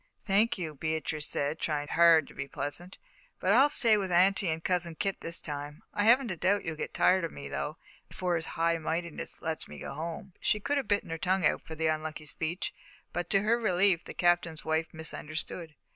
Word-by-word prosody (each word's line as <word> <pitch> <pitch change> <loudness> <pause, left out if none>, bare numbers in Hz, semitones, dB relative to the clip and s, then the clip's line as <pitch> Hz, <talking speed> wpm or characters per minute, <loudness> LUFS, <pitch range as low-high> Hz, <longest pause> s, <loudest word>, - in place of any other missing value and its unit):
"Thank 210 +3 +3
you," 165 -4 -4
Beatrice 155 0 -2
said, 145 +3 -2
trying 145 -1 -2
hard 165 -2 +6
to - - -13
be 140 - -5
pleasant; 145 +7 -6 0.4
"but 190 - +2
I'll 270 +6 +7
stay 230 -6 +4
with 190 -3 -2
Aunty 185 +1 +4
and 160 +1 -2
Cousin 175 -2 +1
Kit 195 +3 -2
this 165 0 0
time. 145 0 -6
I 205 - +1
haven't 240 0 +5
a - - -2
doubt 190 +4 +1
you'll 165 -1 -2
get - - -4
tired 185 -1 +4
of 165 - -2
me, 140 - -8
though, 150 +2 -4 0.3
before 180 -1 -1
His 160 -1 -2
High 165 0 +2
Mightiness 165 +1 -3
lets 160 -1 -1
me - - -10
go - - -6
home." 165 +5 -6
She 210 - +1
could 285 +8 0
have 275 - -1
bitten 205 -5 0
her 165 - -3
tongue 185 -1 +1
out - - +2
for 160 - -9
the 160 +1 -2
unlucky 155 0 -2
speech, 160 +4 -3 0.4
but, 175 0 -3
to 195 0 +3
her 230 +3 +3
relief, 185 -4 +3
the - - -8
Captain's 175 -3 +1
wife 160 0 +1
misunderstood. 160 0 -4
170 Hz, 210 wpm, -30 LUFS, 160-190 Hz, 0.4 s, I'll